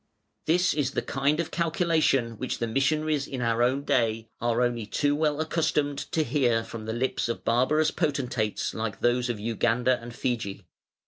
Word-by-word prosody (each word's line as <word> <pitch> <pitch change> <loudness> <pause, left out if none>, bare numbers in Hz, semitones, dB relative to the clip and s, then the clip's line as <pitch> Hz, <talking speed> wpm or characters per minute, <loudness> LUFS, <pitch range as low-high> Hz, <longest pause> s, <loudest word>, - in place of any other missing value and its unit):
This 180 +3 +3
is 140 -3 -1
the - - -1
kind 140 +3 0
of 170 - -2
calculation 160 - +1
which 130 - -2
the 115 - -1
missionaries 145 +4 0
in 130 - -5
our 115 -1 +1
own 130 +3 +2
day 115 -4 0
are 120 +1 +2
only 120 -3 -1
too 145 +6 +1
well 150 -1 +1
accustomed 155 -3 0
to 160 - +2
hear 125 -7 +1
from 115 -1 -8
the - - -1
lips 120 0 -1
of 115 - -4
barbarous 150 +7 +3
potentates 130 - -1
like 110 -3 -4
those 120 +1 +2
of 115 -3 -2
Uganda 120 +3 +1
and 120 +1 -8
Fiji. 115 -7 -3
125 Hz, 175 wpm, -27 LUFS, 115-150 Hz, -, This